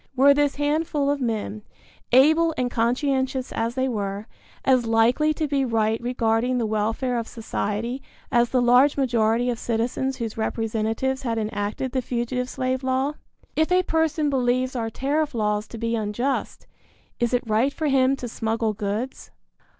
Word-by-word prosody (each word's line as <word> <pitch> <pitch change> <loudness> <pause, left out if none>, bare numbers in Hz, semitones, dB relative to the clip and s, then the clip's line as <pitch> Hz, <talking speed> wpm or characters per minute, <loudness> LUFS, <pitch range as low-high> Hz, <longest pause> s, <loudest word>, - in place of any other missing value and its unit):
Were 275 +2 +6
this 290 0 +1
handful 290 -1 0
of 285 -1 -2
men, 220 -3 -2 0.5
able 315 +6 +5
and 250 -1 -1
conscientious 260 +2 0
as 230 +1 -2
they 260 0 +1
were, 205 -3 -3 0.4
as 255 -3 +3
likely 235 +7 +3
to 310 - -1
be 280 -1 +1
right 225 -2 0
regarding 240 0 0
the 235 - 0
welfare 225 +4 -1
of 230 - -5
society 230 +2 -3 0.3
as 240 0 +3
the 255 -1 +2
large 250 +4 +5
majority 240 -2 +2
of 235 - -4
citizens 245 +3 -1
whose 225 -2 -4
representatives 225 +4 -1
had 230 -3 -2
enacted 210 +3 -2
the 260 - 0
fugitive 250 +1 -2
slave 260 0 -2
law? 260 +2 0 0.4
If 315 +2 +1
a 365 0 +4
person 315 -3 +1
believes 255 0 +1
our 225 -2 -1
tariff 285 +4 -1
laws 210 -1 0
to 230 - -9
be 230 +1 -1
unjust, 225 +5 -2 0.5
is 240 -1 +1
it 245 -1 +1
right 225 +5 +2
for 315 - -4
him 270 -1 +3
to 250 -2 -6
smuggle 225 -1 -1
goods? 210 +5 -4
245 Hz, 160 wpm, -24 LUFS, 225-270 Hz, 0.5 s, Were